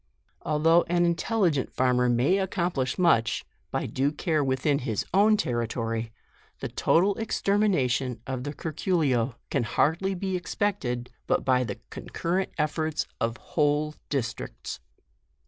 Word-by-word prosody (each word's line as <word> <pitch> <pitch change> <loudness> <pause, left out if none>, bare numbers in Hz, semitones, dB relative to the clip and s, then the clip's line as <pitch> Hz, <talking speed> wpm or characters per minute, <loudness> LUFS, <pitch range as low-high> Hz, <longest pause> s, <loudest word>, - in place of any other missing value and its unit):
Al 150 - 0
though 165 +3 +5
an 175 0 +3
intelligent 170 - +1
farmer 125 -1 +2
may 125 +11 +3
accomplish 175 -8 -1
much, 165 -11 +3 0.2
by - - -2
due 135 +2 0
care 155 -1 0
within 135 +2 +1
his 115 -7 -2
own 210 +3 +5
territory, 115 - -2 0.5
the - - -3
total 190 +5 +3
extermination 180 - +1
of 130 -1 -3
the 145 - -3
curculio 145 - 0 0.2
can - - +2
hardly 165 - +1
be 190 +1 -2
expected, 175 - -2 0.2
but - - +1
by 125 -1 +3
the - - -5
concurrent 185 +3 -2
efForts 155 0 0
of 115 0 -1
whole 150 0 0 0.2
districts. 130 -6 -4
150 Hz, 130 wpm, -27 LUFS, 125-175 Hz, 0.5 s, though